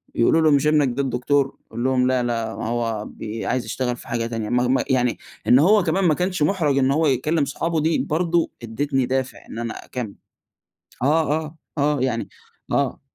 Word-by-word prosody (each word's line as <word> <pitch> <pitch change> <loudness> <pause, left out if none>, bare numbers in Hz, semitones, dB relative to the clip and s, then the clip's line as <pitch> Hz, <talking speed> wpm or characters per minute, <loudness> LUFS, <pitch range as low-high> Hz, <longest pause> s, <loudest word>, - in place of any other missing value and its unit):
يقولوا 160 +7 +4
له: 155 -1 +4
"مش 145 +1 +3
إبنك 150 -2 +4
ده 140 - 0
الدكتور؟" 135 +2 0
يقول 115 +2 -5
لهم: 130 -1 +2
"لأ، 130 -1 +1
لأ، 115 -2 -2
ما - - -4
هو 115 -3 -2
بي 110 +1 -6
عايز 125 -1 -1
يشتغل 125 +2 -2
في - - -13
حاجة 115 -1 -1
تانية." 115 -2 -4
ما 125 0 +2
ما 130 - +2
يعني 125 -2 +2 0.3
إن 125 - +7
هو 200 +6 +5
كمان 185 +3 +1
ما 160 - +5
كانش 180 +2 -2
مُحرَج 150 -5 +1
إن 135 0 +3
هو 155 +3 +2
يكلّم 145 +3 +1
صحابه، 165 +4 -1
دي 160 +1 +2
برضه 170 +1 0
ادّيتني 135 +3 -1
دافع 130 +1 -2
إن 115 - -6
أنا 115 -1 -5
أكمّل. 120 -6 -5 0.9
آه، 150 +2 +2
آه. 155 +1 -10 0.2
آه، 145 -1 +2
يعني 125 -3 -1 0.4
آه. - - 0
135 Hz, 195 wpm, -22 LUFS, 120-155 Hz, 0.9 s, إن